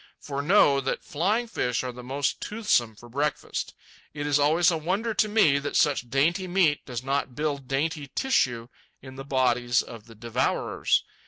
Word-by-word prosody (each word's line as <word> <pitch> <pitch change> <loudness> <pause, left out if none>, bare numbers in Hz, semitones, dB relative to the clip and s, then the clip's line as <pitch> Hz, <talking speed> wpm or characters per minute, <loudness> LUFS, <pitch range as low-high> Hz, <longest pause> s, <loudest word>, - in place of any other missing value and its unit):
For 140 -1 -4
know 145 -4 +4
that 135 - -3
flying 205 +10 0
fish 125 - -2
are 125 -1 -4
most 130 +3 -3
toothsome 155 - 0
for 120 - -14
breakfast. 145 +5 -3 0.4
It 145 0 -4
is 145 -1 +2
always 160 +4 +4
a 165 - 0
wonder 195 +8 -1
to 215 0 +1
me 180 -10 +4
that 145 +1 -5
such 135 -5 +2
dainty 170 +9 +1
meat 175 -5 +2
does 125 -2 -5
not 135 -2 -2
build 145 -3 -3
dainty 145 +1 -2
tissue 125 - +1 0.4
in 130 -1 -10
the 135 - -7
bodies 125 -3 +1
of 115 -2 -11
the 115 - -14
devourers. 115 +1 0
140 Hz, 170 wpm, -26 LUFS, 125-165 Hz, 0.4 s, know